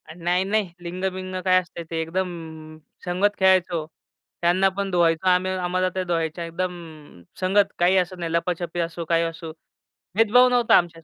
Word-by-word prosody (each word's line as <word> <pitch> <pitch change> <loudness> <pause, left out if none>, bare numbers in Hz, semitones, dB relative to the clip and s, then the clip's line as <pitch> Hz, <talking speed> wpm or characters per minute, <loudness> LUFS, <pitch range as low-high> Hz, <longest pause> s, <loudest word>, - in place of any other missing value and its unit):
नाही-नाही. 185 +3 0
लिंग-बिंग 185 +1 -4
काय 185 0 +5
असते 170 -1 -9
ते 165 -1 -3
एकदम 180 +3 -2 0.8
संगत 195 +4 +1
खेळायचो. 180 -4 +3 0.6
त्यांना 180 +3 +3
पण 200 -1 -2
धुवायचो 170 0 +2
आम्ही, 185 +1 +2
आम्हाला 185 0 -1
त्या 185 0 -2
धुवायच्या. 170 -1 -2
एकदम 165 - -7 0.2
संगत 195 +2 +2
काही 180 +2 +4
असत 185 0 0
नाही. 170 -1 -3
लपाछपी 175 0 -2
असो, 170 0 -3
काही 165 +1 +2
असो, 165 -1 -5 0.6
भेदभाव 225 +3 +5
नव्हता 245 -2 +4
आमच्यात. 165 -2 -2
180 Hz, 145 wpm, -23 LUFS, 170-185 Hz, 0.8 s, काय